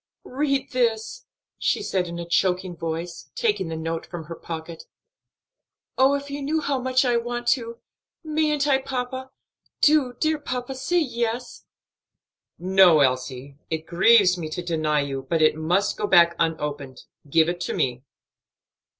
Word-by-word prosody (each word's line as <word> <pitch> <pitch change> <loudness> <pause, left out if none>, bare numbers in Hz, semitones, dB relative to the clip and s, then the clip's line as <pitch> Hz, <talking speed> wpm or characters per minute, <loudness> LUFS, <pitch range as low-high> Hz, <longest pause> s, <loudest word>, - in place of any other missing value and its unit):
"Read 275 0 -1
this," 240 - -1 0.3
she 425 - 0
said, 185 - -1
in 170 0 -6
a 170 0 -6
choking 180 +1 0
voice, 165 -4 -5
taking 210 -5 0
the 165 0 -4
note 165 +1 -3
from 175 -2 -7
her 165 +2 -8
pocket. 165 0 -8 1.1
"Oh, 265 +2 +4
if 280 0 -5
you 285 0 -4
knew 305 +3 0
how 280 -3 -1
much 255 +1 +1
I 240 -1 +2
want 240 +1 -3
to! 235 -2 0 0.5
Mayn't 305 -2 0
I, 270 -2 +3
papa? 260 0 -4 0.5
do, 290 -5 +4
dear 315 -1 +1
papa, 255 -2 -4
say 310 +7 -1
yes." 240 -5 -2 0.9
"No, 185 -3 +5
Elsie; 130 +1 -1
it 160 0 -3
grieves 185 +1 +4
me 160 -2 -4
to 175 +3 -5
deny 155 -3 0
you, 135 -1 -5
but 165 -2 +2
it 155 - +4
must 170 +5 0
go 210 - -1
back 170 -3 +5
unopened. 150 -5 -3 0.3
Give 160 +2 +4
it 175 0 -3
to - - -2
me." 125 -1 -1
190 Hz, 155 wpm, -24 LUFS, 160-260 Hz, 1.1 s, No